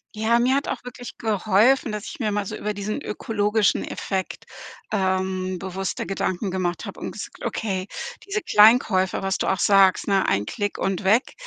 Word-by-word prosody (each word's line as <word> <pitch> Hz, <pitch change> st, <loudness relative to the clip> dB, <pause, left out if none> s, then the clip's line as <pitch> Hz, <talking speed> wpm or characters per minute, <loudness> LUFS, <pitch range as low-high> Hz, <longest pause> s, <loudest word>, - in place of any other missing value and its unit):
Ja, 220 Hz, +2 st, +2 dB
mir 255 Hz, +2 st, +3 dB
hat 280 Hz, -, -1 dB
auch -, -, -4 dB
wirklich 245 Hz, -1 st, -9 dB
geholfen, 220 Hz, +4 st, +2 dB
dass 210 Hz, 0 st, -5 dB
ich -, -, -8 dB
mir 215 Hz, -4 st, 0 dB
mal 205 Hz, 0 st, -1 dB
so -, -, -5 dB
über 210 Hz, 0 st, -3 dB
diesen 205 Hz, +1 st, -4 dB
ökologischen 210 Hz, 0 st, 0 dB
Effekt, 190 Hz, -1 st, -4 dB, 0.5 s
ähm, 185 Hz, -2 st, -1 dB
bewusster 190 Hz, 0 st, -4 dB
Gedanken 195 Hz, 0 st, -2 dB
gemacht 180 Hz, -2 st, -2 dB
habe -, -, -8 dB
und -, -, -4 dB
gesagt -, -, -9 dB
hab: -, -, -1 dB
„Okay, 190 Hz, -3 st, -3 dB, 0.4 s
diese 405 Hz, +1 st, -2 dB
Kleinkäufe, 210 Hz, -, +4 dB
was 195 Hz, 0 st, -1 dB
du -, -, -2 dB
auch 190 Hz, -, +1 dB
sagst, 195 Hz, -2 st, +4 dB
ne: 195 Hz, -2 st, +2 dB
‚Ein 100 Hz, +1 st, +1 dB
Klick 205 Hz, -, -3 dB
und 195 Hz, +1 st, -2 dB
weg‘, 215 Hz, +6 st, +2 dB
205 Hz, 185 wpm, -23 LUFS, 190-220 Hz, 0.5 s, Kleinkäufe